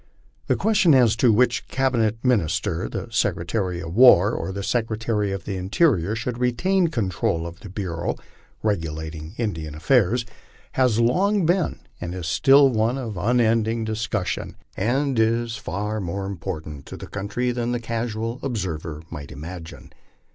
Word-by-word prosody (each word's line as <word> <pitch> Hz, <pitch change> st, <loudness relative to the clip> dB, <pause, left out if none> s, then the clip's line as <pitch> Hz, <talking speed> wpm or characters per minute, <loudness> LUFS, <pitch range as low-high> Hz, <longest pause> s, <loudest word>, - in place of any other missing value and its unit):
The -, -, +3 dB
question 200 Hz, -7 st, +4 dB
as 120 Hz, -4 st, +5 dB
to 120 Hz, -1 st, +4 dB
which 125 Hz, +4 st, +2 dB
cabinet 115 Hz, -4 st, 0 dB
minister, 105 Hz, -12 st, +1 dB
the -, -, -5 dB
Secretary 90 Hz, -5 st, -1 dB
of 80 Hz, 0 st, -6 dB
War 110 Hz, -5 st, +7 dB
or 90 Hz, -4 st, -3 dB
the 100 Hz, +1 st, -5 dB
Secretary 110 Hz, -2 st, -1 dB
of 95 Hz, -3 st, -4 dB
the 100 Hz, -2 st, -3 dB
Interior, 100 Hz, -, +2 dB
should 115 Hz, +2 st, -4 dB
retain 175 Hz, +10 st, +2 dB
control 95 Hz, -, -1 dB
of 85 Hz, 0 st, -8 dB
the 100 Hz, -, -10 dB
bureau 90 Hz, -4 st, -3 dB, 0.5 s
regulating 80 Hz, -3 st, -3 dB
In 110 Hz, -4 st, -1 dB
dian 80 Hz, -2 st, -7 dB
affairs, 120 Hz, -, +2 dB, 0.5 s
has 125 Hz, -4 st, +2 dB
long 185 Hz, -, +2 dB
been 175 Hz, +2 st, +1 dB, 0.2 s
and 85 Hz, +1 st, -4 dB
still 135 Hz, -, +5 dB
is 115 Hz, -, -2 dB
one 115 Hz, +4 st, +1 dB
of 115 Hz, -6 st, -5 dB
unending 115 Hz, +2 st, +2 dB
discussion, 110 Hz, -3 st, -2 dB, 0.2 s
and 130 Hz, +4 st, 0 dB
is 115 Hz, +1 st, +1 dB
of -, -, -12 dB
far 105 Hz, +5 st, -3 dB
more 95 Hz, +2 st, -3 dB
importance 80 Hz, -6 st, -5 dB
to -, -, -8 dB
the -, -, -8 dB
country 105 Hz, +5 st, -2 dB
than 120 Hz, 0 st, -2 dB
the 120 Hz, -, -1 dB
casual 115 Hz, 0 st, -3 dB
observer 85 Hz, -, -4 dB
might 75 Hz, -3 st, -7 dB
imagine. 80 Hz, +3 st, -9 dB
110 Hz, 155 wpm, -23 LUFS, 90-120 Hz, 0.5 s, War